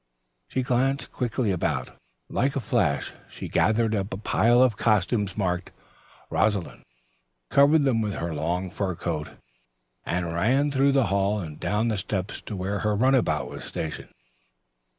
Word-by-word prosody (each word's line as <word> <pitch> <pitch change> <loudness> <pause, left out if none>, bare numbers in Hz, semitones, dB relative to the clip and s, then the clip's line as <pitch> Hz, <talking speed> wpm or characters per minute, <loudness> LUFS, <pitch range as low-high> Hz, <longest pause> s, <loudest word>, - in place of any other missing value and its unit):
She 130 - -1
glanced 135 +2 0
quickly 120 -3 -1
about. 75 -8 -1 0.4
Like 135 +3 0
a - - +1
flash 105 - 0 0.2
she - - -7
gathered 110 +1 +2
up 100 -2 -2
a 95 - -3
pile 120 +4 +3
of 125 -4 +3
costumes 105 -1 +1
marked 90 -3 -1 0.6
"Rosalind," 100 -5 0 0.7
covered 145 +2 +5
them 125 -5 +2
with 105 -2 -2
her 85 -1 -3
long 85 +4 -2
fur 95 -3 -2
coat 80 -3 -3 0.7
and 85 -1 -2
ran 130 - +2
through 140 0 +3
the 135 -3 +4
hall 100 +1 +1
and 80 -5 -7
down 110 +3 0
the 110 - -1
steps 95 0 -3
to 105 - -4
where 100 +2 -2
her 105 -1 0
runabout 130 +3 +2
was - - -8
stationed. 80 -1 -5
105 Hz, 150 wpm, -26 LUFS, 90-125 Hz, 0.7 s, covered